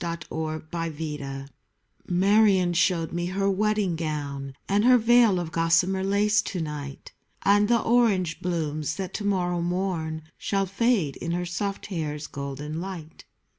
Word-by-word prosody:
WHAT 170 -2 -4
SHE 155 0 -3
THOUGHT 150 -5 -4 0.6
Marion 190 -1 +4
showed 170 -1 +1
me 175 0 -1
her 195 +2 -1
wedding 205 -2 +1
gown 145 -4 -4
And 200 +1 +2
her 250 +1 +7
veil 230 -4 +5
of 170 -2 -4
gossamer 170 +4 +2
lace 210 +2 +3
to 190 - -4
night, 150 -3 -6 0.3
And 205 +1 +4
the 235 +1 +3
orange 205 -8 +2
blooms 155 -4 -2
that 190 0 -5
to 210 - -4
morrow 180 -3 0
morn 170 -3 -2 0.2
Shall 195 -1 0
fade 195 - +1
in 170 0 -3
her 180 +1 -1
soft 195 +3 -3
hair's 150 -5 -4
golden 145 +3 -5
light. 175 -4 -8
175 Hz, 145 wpm, -26 LUFS, 155-195 Hz, 0.6 s, her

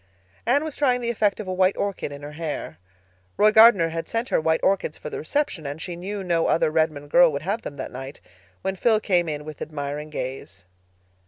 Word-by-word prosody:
Anne 280 +5 +3
was 315 -3 -5
trying 255 -4 +2
the 235 -1 -1
effect 210 -3 +1
of 210 - -6
a 185 - -2
white 185 +1 +2
orchid 200 -7 -3
in 140 0 -9
her 145 - -7
hair. 150 - -5 0.6
Roy 215 +1 +5
Gardner 215 -6 +7
had 165 0 -5
sent 230 +2 -2
her - - +2
white 160 0 +2
orchids 190 -5 +1
for 150 - -8
the - - -4
reception, 170 - -2
and 145 +2 -5
she 175 +1 -5
knew 195 +3 -5
no 170 -2 +1
other 160 - +2
Redmond 155 -2 0
girl 175 0 +6
would 140 0 -4
have 205 +6 -2
them 145 - -7
that 130 - -6
night—when 125 - -8
Phil 220 +2 +3
came 175 -5 +1
in 150 -1 -4
with 155 -2 -9
admiring 150 0 -5
gaze. 125 -10 -6
165 Hz, 215 wpm, -24 LUFS, 145-205 Hz, 0.6 s, Gardner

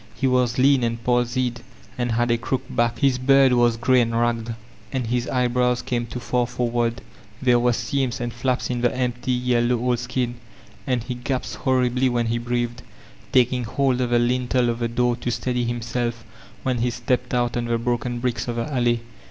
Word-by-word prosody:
He 135 - -2
was 125 -2 +2
lean 135 0 +4
and 115 0 0
palsied, 120 0 0 0.3
and 120 -2 -1
had 120 +1 +1
a 120 - +3
crooked 130 +2 -3
back; 120 0 +1
his 135 -2 +2
beard 135 0 +5
was 120 -1 +3
grey 130 +2 +4
and 115 0 0
ragged, 115 -1 0 0.4
and 130 -3 -2
his 120 +1 -1
eyebrows 125 -1 +1
came 120 -2 -2
too 120 +2 -6
far 125 0 0
forward; 120 -1 -1 0.4
there 125 -2 +4
were 120 0 +3
seams 130 +2 -1
and 120 -1 -3
flaps 125 +1 -1
in 120 -1 -2
the 120 - +3
en^ty, 125 0 -3 0.2
yeUow 120 -1 +2
old 125 0 0
sidn, 120 0 -2 0.5
and 125 -3 0
he 125 - -4
gasped 125 +1 -3
horribly 130 -1 +2
when 120 -1 0
he 115 +1 0
breathed, 120 0 -2 0.5
taking 125 -1 +3
hold 130 +2 0
of 125 - 0
the 120 - +3
lintd 125 +1 0
of 115 0 -1
the 120 - 0
door 120 +1 +1
to 120 - -3
steady 125 0 -1
himself 120 0 -3 0.4
when 130 -2 0
he 120 +1 +1
stepped 125 +1 -1
out 120 -1 0
oo 120 - 0
the 120 0 0
broken 120 0 -2
brides 120 -1 -2
of 120 - -2
the 115 0 -1
alley. 120 -2 +1
120 Hz, 195 wpm, -23 LUFS, 120-125 Hz, 0.5 s, beard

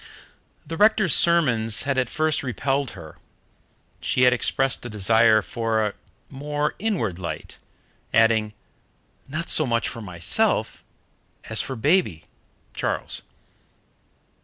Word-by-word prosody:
The 165 - -6
rector's 210 -4 +4
sermons 125 -11 +3
had 135 -1 0
at 125 -2 -1
first 155 -1 0
repelled 135 +1 -2
her, 80 -3 -10 0.9
and - - -23
she 125 - +1
had 125 0 +6
expressed 135 +2 0
a 120 - -6
desire 110 +1 +3
for 115 -1 -1
"a 105 - -3 0.3
more 145 +2 -3
inward 170 - -2
light," 85 - -7 0.5
adding, 110 -1 +3 0.7
"not 155 +4 -4
so 155 - +2
much 115 -1 0
for 115 - -6
myself 90 -5 -1 0.6
as - - +1
for 135 - -5
baby" 120 - +1 0.5
(Charles). - - -2
125 Hz, 120 wpm, -23 LUFS, 110-150 Hz, 0.9 s, had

